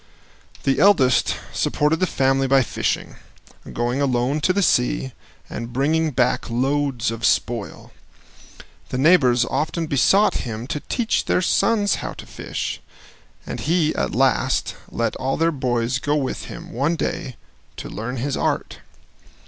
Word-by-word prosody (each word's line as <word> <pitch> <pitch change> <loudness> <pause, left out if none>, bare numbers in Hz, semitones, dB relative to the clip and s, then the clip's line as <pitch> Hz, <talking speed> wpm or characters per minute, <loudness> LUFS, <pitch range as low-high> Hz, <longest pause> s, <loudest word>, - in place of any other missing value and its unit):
The 135 - +1
eldest 150 -9 +4 0.2
supported 150 +2 +1
the 185 - +2
family 135 -2 +1
by 135 0 +4
fishing, - - -2 0.5
going 120 +3 -1
alone 130 +2 +1
to 185 - +3
the 200 +2 +1
sea, 125 -2 +1 0.4
and 115 +1 -6
bringing 155 +5 +1
back 125 -4 0
loads 135 0 0
of 115 0 -7
spoil. 115 -2 -1 1.0
The - - -3
neighbors 130 -5 +4
often 160 +4 -2
besought 175 +8 +3
him 115 -1 -5
to 150 - -2
teach 230 - -1
their 180 - +1
sons 205 +1 +2
how - - -5
to - - -10
fish, - - -5 0.6
and - - -5
he 160 -1 +1
at - - -2
last 60 +1 +1
let - - -2
all 135 +1 -1
their 165 +1 +2
boys 125 -3 -1
go 145 +2 0
with 140 -3 -2
him, - - -9
one 140 +8 0
day, 130 -5 -3 0.4
to - - -6
learn 125 +5 -5
his 135 +3 -2
art. - - -2
135 Hz, 145 wpm, -22 LUFS, 125-155 Hz, 1.0 s, eldest